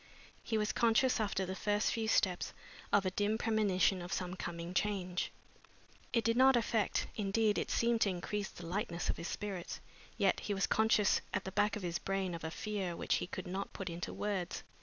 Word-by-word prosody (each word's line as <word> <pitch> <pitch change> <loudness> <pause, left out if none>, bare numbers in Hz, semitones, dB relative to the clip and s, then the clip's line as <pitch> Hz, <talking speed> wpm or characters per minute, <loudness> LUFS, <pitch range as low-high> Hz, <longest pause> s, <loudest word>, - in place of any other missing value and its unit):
He 225 - -1
was 210 0 +1
conscious, 235 +2 +3
after 195 -3 0
the 185 - -3
first 205 +1 +1
few 225 -1 -1
steps, 185 -4 +2 0.4
of 200 -1 +4
a 185 - +1
dim 205 +3 +1
premonition 205 -4 +2
of 175 +1 -7
some 180 -1 -2
coming 170 -1 -5
change. 185 -3 -1 0.8
It 230 - +2
did 230 0 +2
not 265 +1 +6
affect 225 -3 +1
indeed, 210 +1 +2
it - - -3
seemed 235 -1 +2
to 200 - +4
increase 195 +2 -3
the 175 - -10
lightness 175 -1 -1
of - - -7
his 170 - -4
spirits, 195 -4 -4 0.4
yet 200 -3 +3
he 205 - -2
was 195 - +2
conscious 220 -2 +3
at - - 0
the 190 - -5
back 205 +1 +2
of 210 - -5
his 175 -1 -1
brain 195 -2 -1
of 165 - -6
a 160 - -2
fear 195 -1 -3
which - - +1
he - - -3
could 185 - -6
not 190 +2 -4
put 190 -3 -4
into 170 +1 -4
words. 200 -4 -2
200 Hz, 200 wpm, -34 LUFS, 180-215 Hz, 0.8 s, not